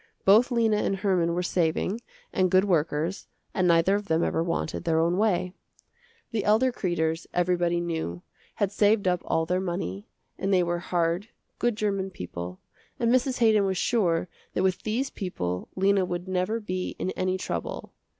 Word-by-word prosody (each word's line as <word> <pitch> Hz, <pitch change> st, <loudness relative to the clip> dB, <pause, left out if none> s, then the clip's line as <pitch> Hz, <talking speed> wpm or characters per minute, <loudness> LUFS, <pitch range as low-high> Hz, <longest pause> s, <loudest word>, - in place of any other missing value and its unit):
Both 215 Hz, +6 st, +6 dB
Lena 230 Hz, -4 st, +2 dB
and 195 Hz, -, 0 dB
Herman 185 Hz, -4 st, +1 dB
were 180 Hz, -, 0 dB
saving 180 Hz, +5 st, 0 dB, 0.3 s
and 185 Hz, -1 st, +2 dB
good 185 Hz, +2 st, +4 dB
workers 165 Hz, 0 st, 0 dB, 0.3 s
and 185 Hz, -1 st, +2 dB
neither 170 Hz, +2 st, +4 dB
of 205 Hz, 0 st, -1 dB
them 160 Hz, -1 st, +2 dB
ever -, -, 0 dB
wanted 170 Hz, -1 st, -2 dB
their 165 Hz, -2 st, +2 dB
own 170 Hz, +2 st, +2 dB
way. 185 Hz, -4 st, +1 dB, 0.8 s
The 220 Hz, -4 st, -1 dB
elder 225 Hz, +5 st, +3 dB
Kreders, 165 Hz, -6 st, -1 dB
everybody 175 Hz, -1 st, +2 dB
knew, 160 Hz, -, -3 dB, 0.3 s
had 205 Hz, -4 st, 0 dB
saved 205 Hz, -1 st, +3 dB
up 180 Hz, -1 st, +2 dB
all 165 Hz, 0 st, 0 dB
their 180 Hz, +2 st, 0 dB
money, 170 Hz, -, -4 dB, 0.3 s
and 195 Hz, -, -1 dB
they 185 Hz, -2 st, +4 dB
were 175 Hz, 0 st, -1 dB
hard, 175 Hz, +3 st, -1 dB, 0.3 s
good 240 Hz, -2 st, +1 dB
german 200 Hz, -3 st, -1 dB
people, 90 Hz, -, -7 dB, 0.4 s
and 235 Hz, 0 st, +2 dB
Mrs. 255 Hz, 0 st, +2 dB
Haydon 215 Hz, -3 st, +5 dB
was 190 Hz, -1 st, 0 dB
sure 180 Hz, -6 st, +1 dB, 0.3 s
that 185 Hz, -, +1 dB
with 185 Hz, -1 st, +1 dB
these 240 Hz, +6 st, -1 dB
people 90 Hz, -, -4 dB
Lena 195 Hz, 0 st, +3 dB
would 175 Hz, 0 st, -4 dB
never 185 Hz, +4 st, 0 dB
be 185 Hz, -4 st, -4 dB
in 185 Hz, -, -2 dB
any 185 Hz, 0 st, -1 dB
trouble. -, -, -5 dB
185 Hz, 170 wpm, -27 LUFS, 170-205 Hz, 0.8 s, Both